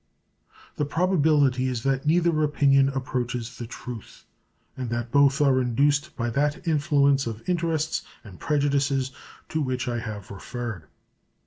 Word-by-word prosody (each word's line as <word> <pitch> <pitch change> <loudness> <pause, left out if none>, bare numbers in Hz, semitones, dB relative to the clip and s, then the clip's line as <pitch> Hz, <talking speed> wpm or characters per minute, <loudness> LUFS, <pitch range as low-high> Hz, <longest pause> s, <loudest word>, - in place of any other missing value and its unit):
The 150 - 0
probability 145 -5 +2
is 125 -3 -3
that 135 +1 0
neither 165 -1 +3
opinion 140 -2 +4
approaches 125 -3 -3
the 120 - -5
truth, 120 -1 -9 0.5
and 130 -2 -4
that 120 0 -3
both 140 +1 +4
are 135 -3 +4
induced 145 +6 +1
by 120 -1 -2
that 145 +7 -1
influence 140 -4 +3
of 115 -1 -6
interests 165 -3 0 0.2
and 95 -5 -13
prejudices 140 -3 +1 0.4
to 160 - -1
which 130 -2 -2
I 120 -1 -1
have 110 -3 -7
referred. 110 -2 -6
135 Hz, 135 wpm, -25 LUFS, 120-150 Hz, 0.5 s, opinion